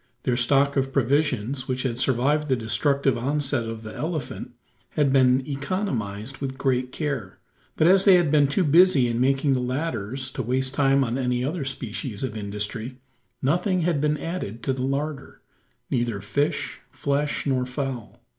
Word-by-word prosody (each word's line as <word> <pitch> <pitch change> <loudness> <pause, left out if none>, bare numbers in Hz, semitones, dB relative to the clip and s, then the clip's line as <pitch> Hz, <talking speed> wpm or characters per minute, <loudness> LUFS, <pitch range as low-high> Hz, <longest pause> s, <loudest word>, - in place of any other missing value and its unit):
Their 125 - +1
stock 140 +3 +3
of 135 0 +1
provisions, 135 -1 0
which 130 0 -2
had 125 -2 -2
survived 140 +4 +2
the 130 - +2
destructive 135 +2 +1
onset 140 -2 -1
of 115 0 -7
the 110 -1 -7
elephant, 155 -2 -4 0.4
had 140 -3 +3
been 130 -1 +4
economised 135 - -3
with 135 -1 -4
great 130 -2 0
care. 140 - -4 0.4
But 155 - +4
as 190 +2 +6
they 195 -2 +7
had 175 -5 +3
been 145 -2 +5
too 145 +7 +1
busy 160 -4 +5
in 120 0 -1
making 135 +2 +2
the 130 - +1
ladders 130 -2 -3
to 130 - -4
waste 130 +2 -1
time 135 -1 +3
on 125 +1 -2
any 125 -1 0
other 150 +3 -2
species 120 -3 -4
of 120 -4 -3
industry, 105 +4 -4 0.5
nothing 180 +6 +1
had 165 -4 +1
been 150 0 +1
added 145 - -5
to 135 - 0
the 130 - -4
larder 140 +2 -3 0.5
neither 120 -4 0
fish, 145 +9 -1
flesh, 145 +1 -1
nor 130 -3 0
fowl. 125 -3 -5
135 Hz, 165 wpm, -25 LUFS, 125-145 Hz, 0.5 s, they